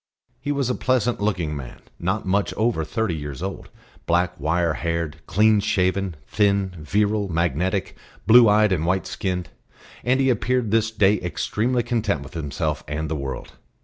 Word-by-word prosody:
He 145 +3 -3
was 140 -3 0
a 125 - +1
pleasant 125 -4 0
looking 90 -7 -1
man, 65 -4 -8 0.2
not 95 +5 -1
much 100 +2 0
over 110 -7 +1
thirty 90 +5 -1
years 75 +1 -6
old; 95 0 -5 0.4
black 90 +1 +2
wire 85 0 +1
haired, 85 -2 -2
clean 110 +1 +4
shaven, 95 -3 0
thin, 100 -2 +1
virile, 105 +5 0
magnetic, 85 +3 -1 0.3
blue 115 +1 +8
eyed 105 0 +4
and 85 -4 +1
white 95 +3 0
skinned; 90 -2 -3 0.5
and 130 +2 +2
he 135 -1 +4
appeared 120 -1 0
this 110 0 +3
day 105 -2 +2
extremely 115 +7 -1
content 110 - -1
with 70 - -12
himself 75 -1 -3
and 75 +1 -3
the - - 0
world. 70 -2 -5
95 Hz, 160 wpm, -23 LUFS, 85-110 Hz, 0.5 s, blue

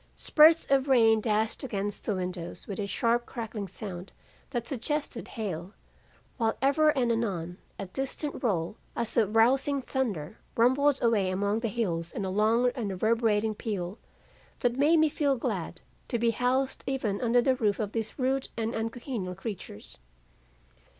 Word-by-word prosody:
Spurts 315 +2 +6
of 275 0 +3
rain 225 -4 +5
dashed 220 +3 0
against 205 -5 -3
the 210 - 0
windows 180 -2 -5
with 200 - -6
a 200 - -2
sharp 235 +4 +1
crackling 220 -4 -5
sound 190 -1 -7 0.4
that 240 -4 -3
suggested 275 0 -3
hail, 190 -3 -5 0.6
while 225 -2 0
ever 285 +3 +4
and 240 -2 +2
anon 185 -7 -2 0.2
a 195 - -4
distant 270 - -4
roll 195 -3 0 0.2
as 230 - -2
of 220 -2 +2
rousing 270 +5 +4
thunder, 220 - -3 0.2
rumbled 260 +4 +4
away 215 -5 +3
among 200 +3 0
the 230 - -1
hills 175 -7 -2
in 200 - -3
a 190 - -2
long 225 +5 +3
and 225 -5 -3
reverberating 220 +2 +1
peal, 205 -3 -4 0.6
that 245 -1 +2
made 295 +5 +4
me 315 0 +5
feel 285 -2 +1
glad 240 - -3 0.3
to 240 - -1
be 230 0 +2
housed 255 +3 0
even 240 -7 -1
under 245 0 +3
the 260 +2 +3
roof 215 -5 +1
of 210 -2 -2
these 225 -1 -4
rude 265 0 0
and 225 0 -1
uncongenial 225 -4 -4
creatures. 180 - -8
225 Hz, 155 wpm, -28 LUFS, 200-255 Hz, 0.6 s, Spurts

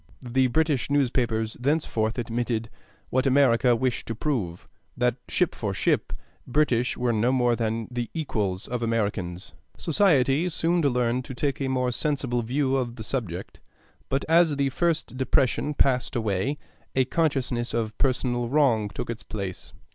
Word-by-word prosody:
The 130 +2 +3
British 150 0 +1
newspapers 120 -5 +1
thenceforward 125 -5 0
admitted 115 -1 -2 0.4
what 130 +2 +2
America 130 -2 +4
wished 125 +1 -1
to 115 - -3
prove, 110 - -2 0.3
that, 125 0 +1
ship 180 - +1
for 100 -3 -3
ship, - - +1 0.4
British 125 -3 +1
were 120 -1 +1
no 115 +3 +2
more 125 -2 +3
than 115 -1 -2
the 120 -1 -3
equals 105 - -2
of 125 0 -3
Americans. 100 -6 -2 0.2
Society 155 -2 +3
soon 170 +1 +1
learned 125 -3 +1
to 130 - -7
take 140 +2 -1
a 135 - 0
more 125 -1 0
sensible 130 -2 -1
view 135 +3 0
of 120 -3 -2
the 110 - -7
subject; 105 -7 -4 0.5
but 135 +1 0
as 165 -2 +4
the 140 -1 +1
first 165 -2 -1
depression 130 +3 +1
passed 130 -1 +2
away, 110 +5 0 0.4
a 130 -1 +3
consciousness 130 -5 0
of 110 -2 -2
personal 120 -3 0
wrong 125 -7 +3
took - - -5
its 115 -1 -5
place. 100 -4 -6
125 Hz, 150 wpm, -26 LUFS, 115-140 Hz, 0.5 s, America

